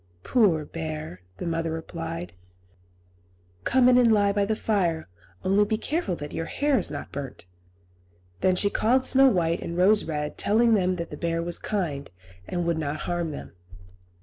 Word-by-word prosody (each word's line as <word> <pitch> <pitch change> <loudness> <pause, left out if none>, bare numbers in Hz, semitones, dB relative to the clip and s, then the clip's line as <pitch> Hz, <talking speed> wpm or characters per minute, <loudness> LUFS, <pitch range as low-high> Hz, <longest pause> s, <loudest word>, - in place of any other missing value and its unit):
"Poor 185 -11 +3
bear!" 155 - -6 0.2
the - - -5
mother 165 -1 -1
replied; 160 - -5 1.3
"come 255 -1 +4
in 250 0 +6
and 235 -2 +5
lie 205 -2 +4
by 200 0 +1
the 215 +2 0
fire; 180 -8 0 0.4
only 195 +2 +3
be 215 +1 0
careful 290 - -2
that 145 -2 -7
your 165 - -3
hair 285 - +1
is - - 0
not 145 -1 -6
burnt." 135 -9 -6 0.9
Then 185 -1 +3
she 200 +2 +2
called 255 +4 +2
Snow 270 +1 +6
White 170 -8 +1
and 170 - -5
Rose 205 +4 +4
Red, 150 -2 -4
telling 230 +3 +3
them 185 -3 +2
that 170 -1 -6
the - - -6
bear 170 0 -1
was 175 0 -1
kind, 160 -9 -3 0.4
and 175 -1 -2
would 170 -1 0
not 150 0 -3
harm 175 -2 -2
them. 145 - -8
175 Hz, 175 wpm, -26 LUFS, 160-215 Hz, 1.3 s, in